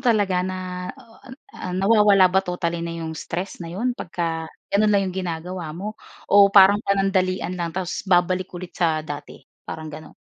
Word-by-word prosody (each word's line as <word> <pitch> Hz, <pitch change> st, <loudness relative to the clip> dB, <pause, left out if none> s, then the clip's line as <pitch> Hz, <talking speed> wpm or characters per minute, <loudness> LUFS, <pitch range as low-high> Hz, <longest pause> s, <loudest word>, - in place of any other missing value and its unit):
talaga? 205 Hz, -7 st, +2 dB
Na, 185 Hz, 0 st, -4 dB
ah, 235 Hz, -4 st, -18 dB, 0.3 s
ah, 180 Hz, -, -6 dB
nawawala 195 Hz, -2 st, +5 dB
ba 190 Hz, -, +4 dB
totally 175 Hz, -2 st, -3 dB
na 170 Hz, 0 st, -4 dB
yung 160 Hz, -, -4 dB
stress 180 Hz, +5 st, -5 dB
na 170 Hz, -, -6 dB
yun 220 Hz, +9 st, -1 dB
pagka 165 Hz, -6 st, -4 dB, 0.2 s
gano'n 210 Hz, +2 st, +4 dB
lang 200 Hz, -1 st, +3 dB
yung 185 Hz, -, -3 dB
ginagawa 175 Hz, 0 st, -5 dB
mo 210 Hz, +4 st, -6 dB, 0.3 s
o 200 Hz, 0 st, +8 dB
parang 200 Hz, +1 st, +7 dB
panandalian 195 Hz, -3 st, 0 dB
lang 175 Hz, -2 st, -3 dB
tapos 185 Hz, -2 st, -2 dB
babalik 185 Hz, 0 st, +2 dB
ulit 175 Hz, 0 st, -8 dB
sa 160 Hz, -3 st, 0 dB
dati? 145 Hz, -1 st, -8 dB, 0.2 s
Parang 155 Hz, -1 st, -6 dB
gano'n. 155 Hz, +1 st, -10 dB
185 Hz, 170 wpm, -23 LUFS, 170-195 Hz, 0.3 s, o